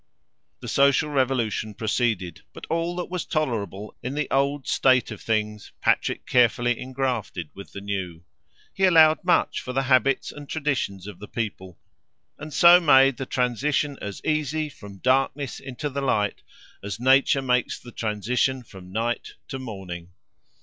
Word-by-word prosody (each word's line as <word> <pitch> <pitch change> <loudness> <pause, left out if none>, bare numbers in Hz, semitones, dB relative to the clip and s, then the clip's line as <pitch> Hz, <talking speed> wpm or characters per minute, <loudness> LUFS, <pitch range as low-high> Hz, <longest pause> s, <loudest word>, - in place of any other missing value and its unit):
The - - -7
social 140 +2 +3
revolution 120 -6 0
proceeded, 105 -7 -1
but - - -9
all 170 +1 -1
that 180 - -3
was 180 -2 -2
tolerable 105 - -3
in 125 +3 -4
the 150 0 -1
old 140 +1 +1
state 130 -1 +3
of - - -8
things, 105 -2 -2
Patrick - - +1
carefully 120 -1 +2
engrafted 125 - -3
with 100 - -11
the 100 - -7
new. 95 -4 -4 0.5
He 190 - +2
allowed 160 -3 +6
much 180 - +2
for 125 - -6
the 135 +1 +1
habits 135 +1 +2
and 145 -1 -11
traditions 135 - -2
of 100 -3 -9
the 105 - -9
people, 95 -5 -5 0.6
and 150 +1 -8
so 175 +4 +8
made 135 -5 +5
the 135 - -5
transition 135 +4 0
as 100 -1 -7
easy, 155 0 0
from 100 -7 -12
darkness 135 +3 0
into 135 +3 -5
the 140 0 -3
light, 105 -6 0 0.4
as 100 +1 -5
Nature 135 +2 +4
makes 125 -1 +1
the 120 - -12
transition 120 +5 -1
from 95 -5 -13
night 115 +3 -2 0.2
to 135 - -5
morning. 90 -8 -8
125 Hz, 155 wpm, -24 LUFS, 105-140 Hz, 0.6 s, so